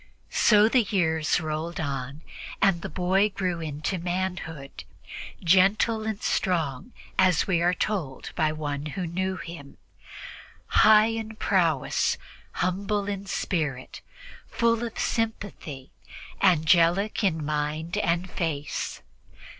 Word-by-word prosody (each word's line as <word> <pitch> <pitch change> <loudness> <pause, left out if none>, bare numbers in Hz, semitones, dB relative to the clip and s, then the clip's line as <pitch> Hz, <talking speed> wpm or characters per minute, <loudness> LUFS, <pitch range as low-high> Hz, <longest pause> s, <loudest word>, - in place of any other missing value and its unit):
So 210 -1 +5
the 250 +2 +4
years 160 -7 +1
rolled 155 +1 -4
on, 140 0 -4 0.4
and 190 -4 +3
the - - -5
boy 190 +5 +2
grew 180 -4 -2
into 155 +4 -3
manhood, 175 -5 -4 0.6
"gentle 200 +5 +3
and 215 -2 -3
strong," 170 - -1 0.3
as 185 -4 +4
we 175 -3 +1
are 175 +1 +2
told 170 -13 -3
by 155 -2 +2
one 150 -1 -4
who 180 +4 -4
knew 185 +2 -2
him, 165 -6 -9 0.9
"high 215 +1 +5
in 220 -1 -5
prowess, 170 -10 +1 0.4
humble 200 +3 -1
in 200 -1 -4
spirit, 150 -10 -3 0.5
full 230 0 +1
of 235 - -5
sympathy, 195 - -3 0.5
angelic 175 +4 +3
in 160 -6 +1
mind 150 +2 -2
and 170 +2 0
face." 150 -4 -3
175 Hz, 115 wpm, -26 LUFS, 155-200 Hz, 0.9 s, So